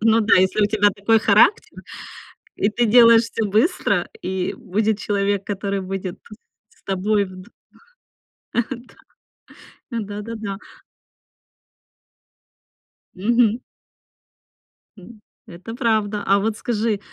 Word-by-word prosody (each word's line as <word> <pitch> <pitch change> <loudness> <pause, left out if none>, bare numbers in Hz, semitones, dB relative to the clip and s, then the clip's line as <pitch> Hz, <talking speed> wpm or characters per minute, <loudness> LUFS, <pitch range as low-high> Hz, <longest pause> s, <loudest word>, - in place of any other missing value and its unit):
Ну 225 0 +4
да, 215 - +4
если 190 +3 +2
у 205 - +4
тебя 205 -1 +3
такой 205 +3 +2
характер, 215 - +3 0.7
и 200 - +1
ты 235 +3 0
делаешь 230 0 +7
всё 225 -1 -3
быстро, 235 - +1
и 185 -1 -3
будет 215 -2 -1
человек, 200 -1 -1
который 200 0 -3
будет 190 -1 -5 0.5
с - - -29
тобой 200 +2 0
вд 185 +2 -12 1.1
Э. - - +1 1.3
Да. 235 -2 -3
Да, 205 0 -6
да, 230 +2 -7
да. 200 -3 -5 2.6
Мгм. 230 +4 +1 1.4
М, 210 +3 -15 0.3
это 180 +6 -10
правда. 215 -4 0
А 200 +1 +3
вот 215 +1 -2
скажи, 220 -2 -1
210 Hz, 110 wpm, -21 LUFS, 195-225 Hz, 2.6 s, делаешь